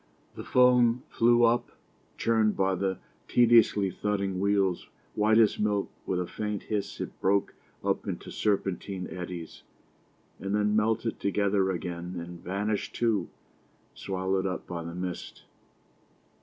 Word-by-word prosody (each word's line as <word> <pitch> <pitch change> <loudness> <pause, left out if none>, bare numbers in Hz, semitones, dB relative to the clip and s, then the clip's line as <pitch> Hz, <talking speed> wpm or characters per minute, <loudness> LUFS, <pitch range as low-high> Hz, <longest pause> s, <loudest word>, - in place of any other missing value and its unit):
The - - -8
foam 125 -1 +4
flew 120 +1 +4
up, 120 +1 +2 0.4
churned 110 -2 +2
by 95 0 +2
the 95 0 -1 0.3
tediously 115 -5 +4
thudding 100 -1 -2
wheels; 100 -2 +1 0.3
white 110 +1 +3
as 110 -2 +4
milk, 105 -1 0 0.2
with 90 - 0
a 90 - -1
faint 105 +2 -4
hiss 105 -2 -3
it - - -6
broke 100 +1 +2 0.3
up - - -1
into - - -5
serpentine 95 -2 -1
eddies, 90 -2 -7 0.8
and 100 +1 -2
then 105 0 +2
melted 110 +1 0
together 100 -1 +1
again 90 0 -4
and 85 0 -8
vanished 100 +3 -2
too, 110 -7 +1 0.6
swallowed 95 0 -1
up 90 - -4
by 85 -2 -5
the 85 +1 -7
mist. 90 0 -6
100 Hz, 130 wpm, -28 LUFS, 95-110 Hz, 0.8 s, foam